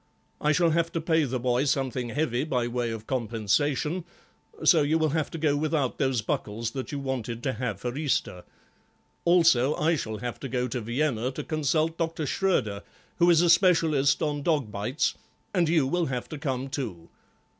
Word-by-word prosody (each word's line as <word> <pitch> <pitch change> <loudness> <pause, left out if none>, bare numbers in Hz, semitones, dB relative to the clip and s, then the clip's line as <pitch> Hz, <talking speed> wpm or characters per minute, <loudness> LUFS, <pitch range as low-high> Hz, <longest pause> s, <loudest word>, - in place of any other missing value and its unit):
I 150 - +3
shall 170 +1 +3
have 165 +1 +1
to 165 - 0
pay 160 -1 +2
the 130 -1 -2
boy 125 +2 +1
something 130 -3 -1
heavy 125 -1 0
by 125 -6 -1
way 120 0 -2
of 110 -1 -6
compensation, 130 - 0 0.6
so 165 -4 +6
you 150 +2 +2
will 160 -1 +1
have 155 +1 -1
to - - -6
go 150 -2 +1
without 150 -3 -1
those 130 -5 +1
buckles 110 +2 -3
that 130 0 -5
you 145 - -3
wanted 125 -4 -4
to 130 - 0
have 125 +3 -3
for 120 0 -4
Easter; 135 - -1 0.8
also 165 -6 +4
I 165 +2 +2
shall 110 -7 -4
have 120 +3 -5
to 135 - -6
go 125 0 -1
to 120 +1 -3
Vienna 120 +1 -1
to - - -5
consult 155 +2 0
Dr. 165 -2 -1
Schroeder, 125 - 0 0.4
who 175 0 +4
is 170 0 +5
a 175 - +3
specialist 165 -6 +3
on 145 -1 -1
dog 145 -8 0
bites, 105 +9 -1 0.4
and 175 -5 +2
you 160 -4 +3
will 175 +5 0
have 125 -2 -3
to 155 - -6
come 135 -2 -2
too. 110 - -5
140 Hz, 190 wpm, -27 LUFS, 120-160 Hz, 0.8 s, so